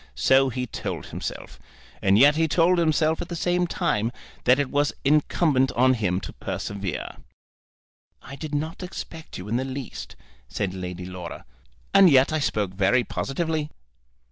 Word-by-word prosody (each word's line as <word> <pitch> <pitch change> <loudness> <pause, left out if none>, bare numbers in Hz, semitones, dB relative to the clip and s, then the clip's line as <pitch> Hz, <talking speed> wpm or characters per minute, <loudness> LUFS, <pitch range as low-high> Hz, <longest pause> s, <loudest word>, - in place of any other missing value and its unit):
So 135 - +4
he 125 +1 -3
told 120 - -5
himself. - - -7 0.4
And 100 +1 +4
yet 145 +5 +6
he 160 +1 +2
told 170 +3 +3
himself 160 -1 +2
at 175 - -6
the 170 - -4
same 175 +1 +1
time 135 - 0 0.3
that 125 +1 +6
it 145 -2 -1
was 145 0 +1
incumbent 145 -2 +3
on 130 +2 +4
him 95 -6 0
to - - -8
persevere. 100 -5 -5 1.0
"I 140 - -10
did 150 0 -5
not 160 +5 -3
expect 170 -3 -8
you 90 - -8
in 115 +3 0
the 130 - -1
least," 135 -1 -7 0.3
said 95 - -3
Lady 90 -1 -6
Laura. 90 -2 -8 0.5
"And 195 -2 +8
yet 135 +1 +5
I 155 - +1
spoke 105 -9 -1
very 100 +6 +3
positively." 155 +3 -2
135 Hz, 160 wpm, -25 LUFS, 105-160 Hz, 1.0 s, And